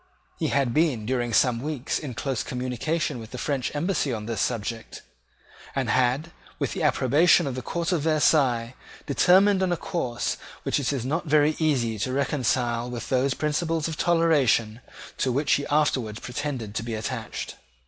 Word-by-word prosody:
He - - 0
had 135 -4 +1
been, 145 -9 +1
during 120 0 -1
some 115 +1 +3
weeks, 145 -2 -2
in 135 -6 -6
close 135 -2 -2
communication 130 +4 -2
with 110 -1 -9
the 125 - -7
French 135 -1 -1
embassy 150 -2 0
on 110 -3 -4
this 110 -2 -2
subject, 115 -1 -3 0.7
and - - 0
had, 130 +6 +1 0.3
with - - -2
the 190 - -4
approbation 150 +3 +4
of 135 - -2
the 130 - -4
court 170 +6 -2
of 175 -4 +1
Versailles, 140 -6 +2 0.3
determined 190 +7 +4
on 185 -1 +1
a 175 - +1
course 165 -12 -2 0.3
which - - 0
it 140 - 0
is 130 -4 -2
not 160 +5 -2
very 150 +1 +4
easy 125 -9 +1
to 130 +6 -1
reconcile 125 -3 0
with 120 -1 -6
those 130 +1 +1
principles 160 +1 -1
of 160 - -4
toleration 145 -10 +2 0.4
to 130 - +1
which 140 +4 0
he 145 - +2
afterwards 130 -8 +1
pretended 125 -4 -4
to - - -2
be 115 0 -4
attached. 110 +1 -5
135 Hz, 170 wpm, -25 LUFS, 120-155 Hz, 0.7 s, approbation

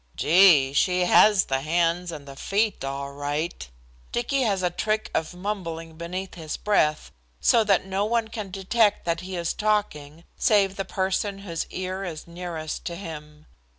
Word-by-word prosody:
"Gee, 160 -6 +5
she 180 +5 +2
has 195 +2 +5
the 135 0 -1
hands 170 +3 0
and 145 -3 -9
the 135 - -9
feet 205 +6 0
all 140 +1 -4
right!" 145 - -3 0.4
Dicky 265 +3 0
has 200 -6 +1
a 180 - +1
trick 215 +4 -1
of 160 +2 -2
mumbling 170 -4 -5
beneath 180 +3 -5
his 160 -3 -5
breath, 155 -8 +1 0.3
so 230 - +4
that 195 -3 +2
no 195 +1 -1
one 225 0 0
can 215 -3 -6
detect 200 +3 +1
that 170 -1 0
he 185 0 -6
is 170 -1 -1
talking 170 -8 -1 0.2
save 200 -3 +3
the 195 - -3
person 195 +2 -1
whose 165 -3 -3
ear 185 +1 -4
is 165 -5 -6
nearest 170 -2 -6
to 170 - -4
him. 150 -4 -9
180 Hz, 165 wpm, -25 LUFS, 160-200 Hz, 0.4 s, Gee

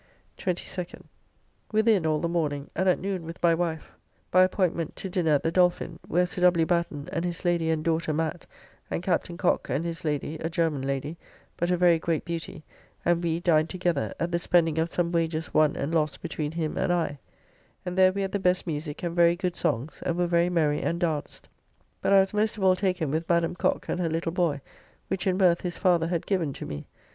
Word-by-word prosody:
22nd. 180 -1 -4 0.7
Within 215 -5 +3
all 155 -1 +2
the 170 - -1
morning, 150 -4 -2
and 185 +2 +2
at 180 - +3
noon 190 -2 -3
with 165 +1 -7
my 170 -1 +5
wife, 165 -2 -2 0.4
by 185 - +6
appointment 180 -3 +1
to 190 - -6
dinner 175 -4 +1
at 145 - +2
the 165 - +1
Dolphin, 180 0 +1
where 180 +1 +2
Sir 180 +1 -5
W. 175 -2 +5
Batten, 170 -4 -1
and 165 - -2
his 175 +1 -4
lady 170 -2 +1
and 160 -1 0
daughter 165 -1 0
Matt, 160 +2 -2 0.4
and 170 - -3
Captain 175 -1 -1
Cocke 180 - +1
and 140 +7 -1
his 165 -1 -4
lady, 150 0 -2
a 160 - -2
German 165 -5 0
lady, 140 +4 -3 0.4
but 175 - -1
a 180 - +2
very 175 -2 +4
great 165 -1 -1
beauty, 165 -1 -5 0.4
and 175 0 +2
we 165 -1 0
dined 160 -2 +3
together, 175 -5 -1
at 170 - -1
the 170 - +1
spending 165 -2 +2
of 165 +1 0
some 170 -1 0
wagers 165 -1 -1
won 155 -1 +4
and 145 +4 -3
lost 155 -2 0
between 150 0 -3
him 160 -2 -2
and - - +1
I; 165 -5 -1 0.7
and 180 - -3
there 185 0 +6
we 200 +1 -2
had 195 - -3
the 200 - -1
best 180 -1 +1
musique 150 -2 -4
and 170 -1 -2
very 170 0 +5
good 180 -1 -2
songs, 125 +7 -2
and 170 - -1
were 175 - +2
very 170 0 +2
merry 155 -4 +1
and 170 - -1
danced, 160 -4 -3 0.5
but - - +1
I 195 -1 +8
was 190 +1 -2
most 215 +1 +1
of 200 - -4
all 185 -1 +5
taken 180 -6 -1
with 160 +2 -2
Madam 170 0 +2
Cocke - - 0
and - - -2
her 170 -2 0
little 165 +1 -1
boy, 165 -6 0 0.5
which 190 0 -2
in 185 -1 +2
mirth 180 -3 +4
his 175 -2 -3
father 175 -3 +3
had 170 -1 -2
given 170 -8 0
to - - -7
me. 75 -1 -7
170 Hz, 220 wpm, -27 LUFS, 160-180 Hz, 0.7 s, I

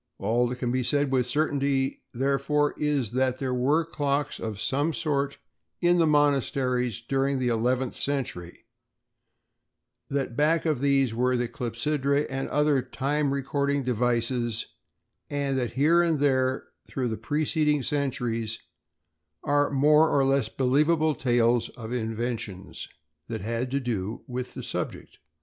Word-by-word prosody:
All 120 +2 +1
that 125 - -3
can 125 -1 -2 0.4
with 125 -2 +2
certainty 140 -2 +1
be - - -16 0.2
said, 120 - -11
therefore, 140 +2 +1
is 145 -7 0
that 130 0 +1
there 130 -2 -2
were 145 +6 +2
clocks 145 -2 -1
of 110 -2 -5
some 145 +8 0
sort 140 -3 -1 0.4
in 175 0 +3
the 165 - +4
monasteries 130 -5 +1
during 135 +3 0
the 125 -1 0
eleventh 125 +2 0
century; 120 -13 -3 1.4
that 135 -4 -2
back 155 +5 +2
of 155 -5 +1
these 135 -4 +2
were 125 +2 +1
the 120 0 0
clepsydræ 140 +5 -1
and 135 0 -3
other 150 -2 +2
time 140 +3 -1
recording 140 0 0
devices; 120 -1 0 0.6
and 140 -2 -1
that 120 -2 -2
here 155 +7 +4
and 165 -3 +1
there 130 -2 +1 0.2
through 130 -2 -2
the 110 - -2
preceding 150 +1 0
centuries 120 -6 -1 0.9
are 145 0 +2
more 150 +3 +4
or 140 -1 +3
less 135 -4 +2
believable 150 +6 +2
tales 120 -2 +2
of 115 0 -6
inventions 115 -4 -4 0.4
that 110 -2 -4
had 115 +4 -2
to 140 +2 0
do 110 -4 -3
with 125 0 -5
the - - -6
subject. - - -5
135 Hz, 140 wpm, -26 LUFS, 120-145 Hz, 1.4 s, the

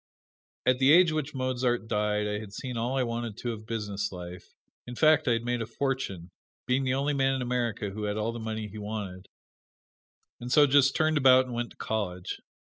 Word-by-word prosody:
At 130 0 +3
the 135 +1 +5
age 175 +1 +7
which 150 -2 -3
Mozart 125 -3 -1
died 105 -1 0
I 105 0 -2
had 105 -2 -10
seen 125 +3 -5
all 120 +3 -1
I 130 - +2
wanted 115 -2 -4
to 120 - -3
of 110 -1 -8
business 100 -3 -3
life, 90 -1 -9 0.3
in 125 - -7
fact 155 +1 +4
I 120 - +4
had 115 0 -1
made 120 -1 -1
a 115 - -3
fortune, 120 -12 -3 0.3
being 130 +2 +1
the 130 0 +1
only 140 +2 0
man 135 -1 +2
in 130 - -2
America 120 -5 -2
who 105 +1 -4
had 105 0 -2
all 110 +2 -1
the 120 - -6
money 110 -1 -4
he 105 +1 -9
wanted, 105 -3 -6 1.1
and 120 +1 -6
so 150 +2 +7
just 140 0 +4
turned 155 -1 +2
about 130 -1 +6
and 125 - -7
went 120 0 -2
to - - -19
college. 90 -5 -3
120 Hz, 210 wpm, -28 LUFS, 105-130 Hz, 1.1 s, age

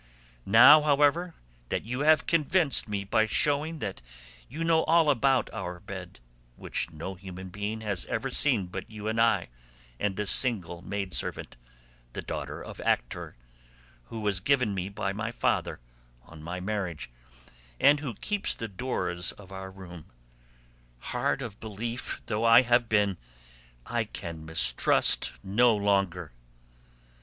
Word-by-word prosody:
Now, 130 +9 +8
however, 150 +4 +2 0.3
that - - -2
you 125 +3 -4
have 155 +2 +4
convinced 165 -3 +2
me 100 -1 -2
by 110 +2 +1
showing 150 +7 0
that 95 - -6 0.5
you 160 +4 -4
know 165 -1 +3
all 165 -2 +4
about 135 -2 +2
our 90 -5 -5
bed - - -9 0.4
(which - - -3
no 85 +5 -7
human 95 0 -9
being 105 +3 -4
has 100 -4 -2
ever 130 +4 -3
seen 125 -8 +3
but 90 +1 -7
you 105 -1 -7
and 110 +1 0
I 110 - +2 0.5
and 105 -1 -2
a 105 - -1
single 95 -8 +2
maidservant, 95 -7 -2 0.6
the - - -5
daughter - - -6
of - - -9
Actor, - - -2 0.7
who 110 - -7
was 105 -3 0
given 125 0 +1
me 95 0 -3
by 100 -1 -3
my 110 +3 -4
father 120 - -1 0.4
on 80 +3 -14
my 90 +3 -5
marriage, 90 - -4 0.7
and 145 +1 +5
who 135 -7 -5
keeps 205 - -1
the 115 - -5
doors 90 -6 -2
of 95 -2 -15
our 95 0 -7
room) 90 -4 -11 0.9
hard 125 - -2
of 110 -4 -8
belief 115 +3 -5
though 105 +2 -2
I 115 +2 +7
have 120 -1 +2
been 105 -3 +2 0.7
I - - -1
can 80 -2 -7
mistrust 80 -6 +3
no 115 +4 +3
longer." 100 -5 0
105 Hz, 145 wpm, -28 LUFS, 95-130 Hz, 0.9 s, Now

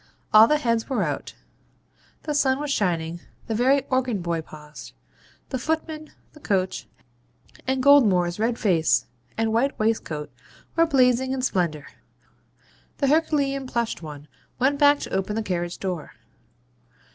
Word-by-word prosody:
All 215 +1 +9
the 300 - +3
heads 230 -4 -1
were 265 - 0
out; - - -4 0.9
the 300 - -2
sun 270 -2 +2
was 295 -1 -3
shining; 170 -7 -1 0.3
the 225 - -3
very 265 +4 +2
organ 255 -5 +1
boy 170 -2 -2
paused; 150 -1 -12 0.6
the 260 - -3
footman, 315 +2 -3 0.2
the 300 - -15
coach, 190 -8 -1 0.8
and 260 0 0
Goldmore's 205 -11 +4
red 230 +2 0
face 160 - +2 0.3
and 225 0 0
white 270 +5 +1
waistcoat 215 -9 -2 0.4
were 330 0 +4
blazing 260 -2 +3
in 260 -1 -3
splendour. 170 - -1 1.1
The 275 - +1
herculean 280 -3 +1
plushed 235 -5 -2
one 150 -2 -9 0.3
went 275 +3 +1
back 290 0 +6
to - - -6
open 195 +2 -1
the 225 - -1
carriage 175 -3 -3
door. 180 -5 -5
230 Hz, 140 wpm, -24 LUFS, 180-275 Hz, 1.1 s, All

